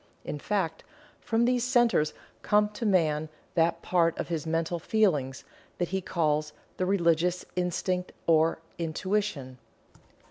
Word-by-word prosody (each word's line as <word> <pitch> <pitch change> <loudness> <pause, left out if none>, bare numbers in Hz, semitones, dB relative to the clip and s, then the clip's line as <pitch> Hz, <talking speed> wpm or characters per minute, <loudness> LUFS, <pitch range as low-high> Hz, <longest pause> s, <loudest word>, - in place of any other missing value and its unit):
In 150 - -4
fact, 180 -3 -2 0.4
from 230 +1 +1
these 245 -1 +2
centers 240 - +3 0.3
come 210 0 +3
to 215 +2 -3
man 155 -5 +2 0.2
that 165 0 +1
part 170 -2 +2
of - - -4
his 160 -2 -3
mental 165 +1 -1
"feelings" 155 -11 +1 0.3
that 175 -1 -1
he 190 +1 -1
calls 155 -4 0 0.2
"the 185 - 0
religious 175 -2 +2
instinct 180 0 -1
or 160 0 +4 0.2
intuition." 165 -5 -2
175 Hz, 130 wpm, -28 LUFS, 160-200 Hz, 0.4 s, or